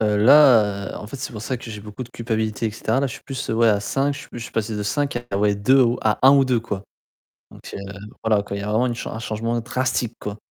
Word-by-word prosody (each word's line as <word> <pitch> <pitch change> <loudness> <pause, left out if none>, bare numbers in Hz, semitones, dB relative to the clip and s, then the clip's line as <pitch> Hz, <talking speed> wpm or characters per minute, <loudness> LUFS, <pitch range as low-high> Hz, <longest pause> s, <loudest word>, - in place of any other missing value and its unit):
Heu, 105 -1 +2
là, 110 -5 +5
heu, - - -8
en - - -8
fait 120 - -8
c'est 130 -1 -6
pour 105 -2 -7
ça 130 +4 -2
que 115 -1 -9
j'ai 105 -1 -7
beaucoup 105 +4 -8
de 120 - -9
culpabilité 110 -2 -2
et - - -1
cetera. 115 +4 -1
Là, 140 - +1
je 130 - -6
suis - - -12
plus 135 -1 -5
ouais 115 +1 +3
à 105 -1 +3
5, 135 +7 0
je 145 - -8
sui - - -13
je - - -6
suis 115 - -8
passé 110 -1 -2
de 105 - -2
5, 120 +2 -2
ah 100 - -1
ouais, 105 0 +2
2 130 +7 +4
ou 120 0 +1
à 110 -1 +2
1 135 - +9
ou 140 -1 +5
2, 125 -3 +1
quoi. 100 -4 -5 0.7
Donc - - -15
heu, - - -5 0.5
voilà 110 -2 +3
quoi, 100 0 -6
il - - -4
y - - -5
a 100 - -4
vraiment 110 +4 +2
une 120 - -1
chan 120 - -6
un 110 - -5
changement 115 +1 -2
drastique, 125 -1 -1
quoi. 105 0 -5
115 Hz, 295 wpm, -22 LUFS, 105-125 Hz, 0.7 s, 1